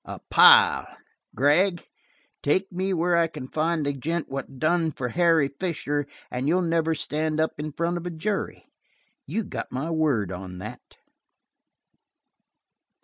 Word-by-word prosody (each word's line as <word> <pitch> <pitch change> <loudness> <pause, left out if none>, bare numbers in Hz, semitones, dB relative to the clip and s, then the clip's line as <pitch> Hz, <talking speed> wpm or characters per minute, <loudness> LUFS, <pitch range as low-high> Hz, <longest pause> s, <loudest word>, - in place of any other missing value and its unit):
A - - -8
pile! - - +7 0.5
Gregg, 170 +6 +2 0.6
take 185 +7 0
me 190 +2 -2
where 175 0 +1
I 170 -1 +3
can 150 -5 -8
find 160 +1 -1
the 145 - 0
gent 160 +5 -3
what 135 0 -6
done 165 +3 +1
for 125 -4 -4
Harry 165 -1 +3
Fisher 145 -5 -2 0.2
and 125 +2 -2
you'll 180 +4 +2
never 165 -1 +1
stand 155 +1 -2
up 160 -1 -1
in 155 +1 -4
front 170 +3 -2
of 175 +1 -5
a - - -2
jury. 195 +5 -4 0.6
You 225 - -2
got - - -6
my 135 +6 -3
word 140 - 0
on 90 0 -7
that." 95 - -10
160 Hz, 145 wpm, -25 LUFS, 145-170 Hz, 0.6 s, pile